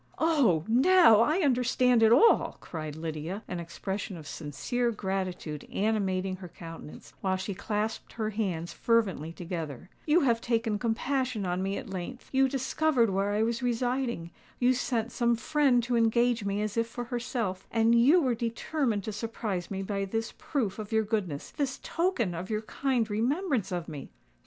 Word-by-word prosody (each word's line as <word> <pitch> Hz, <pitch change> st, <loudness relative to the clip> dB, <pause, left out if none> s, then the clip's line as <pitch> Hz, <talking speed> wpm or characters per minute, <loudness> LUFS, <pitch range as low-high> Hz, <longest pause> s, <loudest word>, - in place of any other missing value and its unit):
"Oh! 275 Hz, -, +3 dB
now 265 Hz, -, +6 dB
I 305 Hz, +11 st, +3 dB
understand 250 Hz, -3 st, +3 dB
it 220 Hz, 0 st, +6 dB
all!" 285 Hz, -, +5 dB
cried 155 Hz, -3 st, -6 dB
Lydia, 160 Hz, +5 st, -5 dB
an 180 Hz, -, -4 dB
expression 190 Hz, +3 st, -5 dB
of 155 Hz, -, -10 dB
sincere 170 Hz, -, -2 dB
gratitude 190 Hz, -7 st, -3 dB
animating 195 Hz, -3 st, 0 dB
her 180 Hz, -1 st, -9 dB
countenance, 165 Hz, -2 st, -10 dB
while 190 Hz, -1 st, +1 dB
she 190 Hz, +2 st, -4 dB
clasped 210 Hz, +3 st, -3 dB
her 220 Hz, -1 st, -2 dB
hands 185 Hz, -6 st, -2 dB
fervently 200 Hz, -9 st, +1 dB
together: 170 Hz, -3 st, -6 dB, 0.2 s
"you 320 Hz, +4 st, +5 dB
have 235 Hz, -5 st, +2 dB
taken 225 Hz, -3 st, 0 dB
compassion 250 Hz, -1 st, -1 dB
on 180 Hz, 0 st, -1 dB
me 195 Hz, +1 st, -1 dB
at -, -, -6 dB
length,—you 255 Hz, +8 st, -1 dB
discovered 265 Hz, -3 st, +1 dB
where 195 Hz, +1 st, 0 dB
I 210 Hz, +1 st, +2 dB
was 235 Hz, +1 st, -1 dB
residing,—you 245 Hz, -2 st, -1 dB
sent 240 Hz, -2 st, -1 dB
some 235 Hz, 0 st, +2 dB
friend 265 Hz, 0 st, +2 dB
to 245 Hz, +1 st, 0 dB
engage 235 Hz, -1 st, +2 dB
me 200 Hz, +1 st, -1 dB
as 215 Hz, +1 st, -3 dB
if 230 Hz, 0 st, +2 dB
for 245 Hz, +1 st, -5 dB
herself,—and 230 Hz, -2 st, -1 dB
you 270 Hz, +10 st, +6 dB
were 255 Hz, -2 st, +2 dB
determined 235 Hz, 0 st, -1 dB
to 215 Hz, -, -4 dB
surprise 210 Hz, -4 st, -3 dB
me 195 Hz, -1 st, -3 dB
by 195 Hz, 0 st, -2 dB
this 225 Hz, +3 st, -3 dB
proof 225 Hz, -9 st, -2 dB
of 210 Hz, 0 st, -6 dB
your 220 Hz, 0 st, +3 dB
goodness—this 215 Hz, -, -2 dB
token 330 Hz, -, 0 dB
of 175 Hz, +3 st, -5 dB
your 215 Hz, 0 st, -1 dB
kind 250 Hz, 0 st, 0 dB
remembrance 250 Hz, -, 0 dB
of 175 Hz, -2 st, -3 dB
me!" 145 Hz, -4 st, -7 dB
220 Hz, 160 wpm, -29 LUFS, 190-245 Hz, 0.2 s, now